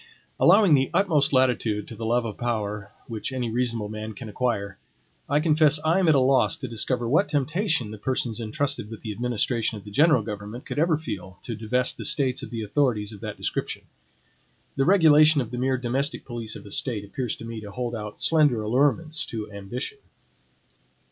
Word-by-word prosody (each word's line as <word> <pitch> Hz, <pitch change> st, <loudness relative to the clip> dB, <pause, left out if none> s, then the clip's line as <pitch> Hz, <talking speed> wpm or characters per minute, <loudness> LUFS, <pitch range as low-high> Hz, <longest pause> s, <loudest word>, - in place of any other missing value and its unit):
Allowing 190 Hz, 0 st, +6 dB
the 135 Hz, -2 st, +3 dB
utmost 155 Hz, -8 st, +3 dB
latitude 120 Hz, -6 st, +1 dB
to 115 Hz, -, -9 dB
the 110 Hz, +1 st, -4 dB
love 120 Hz, +1 st, +1 dB
of 110 Hz, -3 st, -5 dB
power 105 Hz, -4 st, -3 dB
which 115 Hz, +1 st, -4 dB
any 125 Hz, -3 st, -2 dB
reasonable 115 Hz, -3 st, -1 dB
man 110 Hz, +1 st, -6 dB
can 110 Hz, +2 st, -9 dB
require, 100 Hz, -4 st, -2 dB, 0.5 s
I 145 Hz, +2 st, +3 dB
confess 155 Hz, -1 st, +4 dB
I 165 Hz, +4 st, +3 dB
am 185 Hz, -, +2 dB
at 155 Hz, -, +5 dB
a -, -, +5 dB
loss 130 Hz, +1 st, +3 dB
to 130 Hz, -, -5 dB
discover 120 Hz, +1 st, -1 dB
what 145 Hz, +3 st, +2 dB
temptation 150 Hz, -, 0 dB
the 110 Hz, -, -9 dB
persons 120 Hz, -1 st, -1 dB
intrusted 125 Hz, 0 st, -3 dB
with 110 Hz, -1 st, -9 dB
the 110 Hz, -, -5 dB
administration 115 Hz, 0 st, -1 dB
of 100 Hz, -, -11 dB
the 105 Hz, -, -11 dB
general 145 Hz, 0 st, +4 dB
government 105 Hz, +3 st, -7 dB
could -, -, -4 dB
ever 160 Hz, -1 st, +3 dB
feel 95 Hz, -, -7 dB
to 115 Hz, -, -4 dB
divest 125 Hz, +4 st, -1 dB
the -, -, -5 dB
States 130 Hz, -3 st, +1 dB
of -, -, -7 dB
the 115 Hz, -2 st, -4 dB
authorities 110 Hz, -2 st, 0 dB
of 105 Hz, -, -10 dB
that 105 Hz, -2 st, -6 dB
description. -, -, -3 dB, 0.9 s
The 135 Hz, -, +1 dB
regulation 155 Hz, -5 st, +6 dB
of 120 Hz, -3 st, -3 dB
the 125 Hz, -, -4 dB
mere 130 Hz, +1 st, +1 dB
domestic 130 Hz, +4 st, -2 dB
police 115 Hz, -3 st, -4 dB
of -, -, -10 dB
a 100 Hz, -, -11 dB
State 110 Hz, -5 st, -2 dB
appears 120 Hz, +3 st, -3 dB
to 115 Hz, -, -10 dB
me 115 Hz, -1 st, -6 dB
to 105 Hz, -, -9 dB
hold 120 Hz, +3 st, -4 dB
out 105 Hz, -2 st, -6 dB
slender 150 Hz, -9 st, +3 dB
allurements 145 Hz, +7 st, +1 dB
to 110 Hz, -2 st, -6 dB
ambition. 105 Hz, -, -6 dB
120 Hz, 195 wpm, -25 LUFS, 110-145 Hz, 0.9 s, Allowing